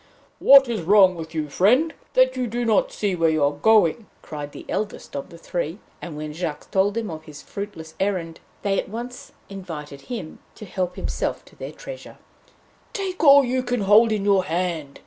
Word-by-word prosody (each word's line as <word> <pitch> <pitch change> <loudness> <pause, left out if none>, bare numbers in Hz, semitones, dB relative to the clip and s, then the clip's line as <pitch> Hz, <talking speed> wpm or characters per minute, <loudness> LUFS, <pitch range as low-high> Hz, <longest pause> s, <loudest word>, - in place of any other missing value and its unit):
'What 275 -1 +8
is 230 -5 -2
wrong 190 +1 +5
with 165 -1 -8
you, 155 -1 -1
friend, 250 - +3 0.2
that 255 0 +4
you 255 -1 -1
do 240 +2 -2
not 220 -3 +2
see 200 -3 -1
where 165 -1 +2
you 155 -2 +1
are 140 - +3
going?' 205 +5 +3 0.2
cried 145 -2 -7
the - - -11
eldest 210 -7 -4
of 140 - -5
the 170 - -12
three; 170 0 -4 0.2
and 165 -4 -7
when 150 0 -5
Jacques 160 -2 -5
told 200 +2 +2
them 225 -5 -3
of 155 0 -8
his 150 -2 -11
fruitless 200 -6 -7
errand, 185 -4 -2 0.2
they 195 -1 +1
at - - -5
once 240 +3 -7 0.2
invited 160 -8 -8
him 210 -11 -6 0.2
to 215 - -10
help 180 -2 -3
himself - - -3
to - - -19
their - - -7
treasure. - - -10 0.8
'Take 380 -4 -3
all 280 -2 +8
you 255 +1 0
can 245 -2 -2
hold 210 +3 +5
in 210 -2 -1
your 195 -2 +3
hand!' 165 -5 -3
195 Hz, 195 wpm, -23 LUFS, 160-230 Hz, 0.8 s, What